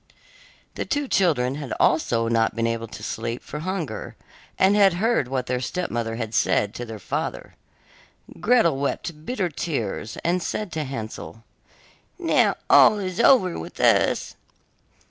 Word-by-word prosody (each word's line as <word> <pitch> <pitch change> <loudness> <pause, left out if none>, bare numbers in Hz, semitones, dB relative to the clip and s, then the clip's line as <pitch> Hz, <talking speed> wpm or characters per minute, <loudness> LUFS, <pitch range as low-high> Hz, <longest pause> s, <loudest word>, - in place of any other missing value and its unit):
The - - -3
two 290 -1 -2
children 150 - +2
had 140 - -5
also 115 -7 +2
not 115 -1 +1
been 115 0 0
able 115 0 -2
to - - -10
sleep 115 +2 -4
for 150 - -7
hunger, 180 -2 -4 0.4
and 195 +2 +4
had 200 -3 +5
heard 205 - +1
what 130 -1 -2
their 125 0 -1
stepmother 120 -7 -3
had 115 -1 -5
said 100 -2 +1
to 120 - -6
their 110 -1 -7
father. 100 - -4 0.9
Gretel 210 - +3
wept 150 +3 -4
bitter 205 -8 -1
tears, 120 - -4
and 175 +2 +1
said 210 +2 -3
to 155 -2 -3
Hansel: 115 -3 -7 0.7
'Now - - +2
all 215 - +7
is 185 -1 -4
over 235 -7 +4
with 80 - -9
us. - - +2
145 Hz, 145 wpm, -24 LUFS, 115-185 Hz, 0.9 s, all